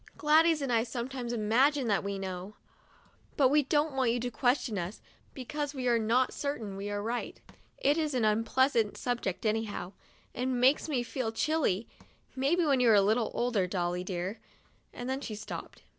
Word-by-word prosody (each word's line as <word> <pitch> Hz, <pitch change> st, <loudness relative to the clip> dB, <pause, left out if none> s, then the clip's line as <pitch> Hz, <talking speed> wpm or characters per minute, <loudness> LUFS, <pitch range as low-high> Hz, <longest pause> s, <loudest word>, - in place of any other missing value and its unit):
Gladys 315 Hz, +1 st, +4 dB
and 255 Hz, -3 st, -1 dB
I 225 Hz, -, +4 dB
some 235 Hz, +1 st, -4 dB
times 250 Hz, -3 st, -5 dB
imagine 245 Hz, +5 st, +2 dB
that 205 Hz, -, +1 dB
we 200 Hz, 0 st, -3 dB
know; 190 Hz, +1 st, -6 dB, 0.8 s
but 270 Hz, -3 st, +5 dB
we 295 Hz, +2 st, +4 dB
don't 295 Hz, +2 st, +1 dB
want 260 Hz, -3 st, +1 dB
you 240 Hz, +1 st, +1 dB
to 245 Hz, 0 st, -3 dB
question 245 Hz, -3 st, 0 dB
us, 175 Hz, +5 st, -5 dB, 0.4 s
because 290 Hz, +3 st, -4 dB
we 255 Hz, -2 st, -2 dB
are 235 Hz, -1 st, +3 dB
not 235 Hz, +4 st, +2 dB
certain 235 Hz, -9 st, -4 dB
we 200 Hz, +1 st, -5 dB
are 205 Hz, 0 st, -3 dB
right. 235 Hz, +2 st, -3 dB, 0.4 s
It 290 Hz, +4 st, +2 dB
is 305 Hz, -4 st, -1 dB
an 235 Hz, -3 st, +2 dB
unpleasant 230 Hz, +1 st, +2 dB
subject 240 Hz, -6 st, -3 dB
anyhow, 215 Hz, -4 st, -2 dB, 0.4 s
and 250 Hz, 0 st, -1 dB
makes 265 Hz, +5 st, +3 dB
me 255 Hz, -5 st, 0 dB
feel 240 Hz, -2 st, -3 dB
chilly. 230 Hz, -, 0 dB, 0.5 s
Maybe 300 Hz, +7 st, +2 dB
when 275 Hz, -3 st, +3 dB
you 245 Hz, -2 st, +4 dB
are 220 Hz, -, +7 dB
a 200 Hz, -, +6 dB
little 220 Hz, +3 st, +2 dB
older, 235 Hz, -6 st, +1 dB
Dolly 180 Hz, -1 st, -2 dB
dear" 185 Hz, +3 st, -4 dB, 0.3 s
— -, -, -38 dB
and 245 Hz, -, -7 dB
then 265 Hz, +1 st, -2 dB
she 220 Hz, -6 st, -5 dB
stopped. 210 Hz, -, -8 dB
240 Hz, 190 wpm, -30 LUFS, 210-270 Hz, 0.8 s, are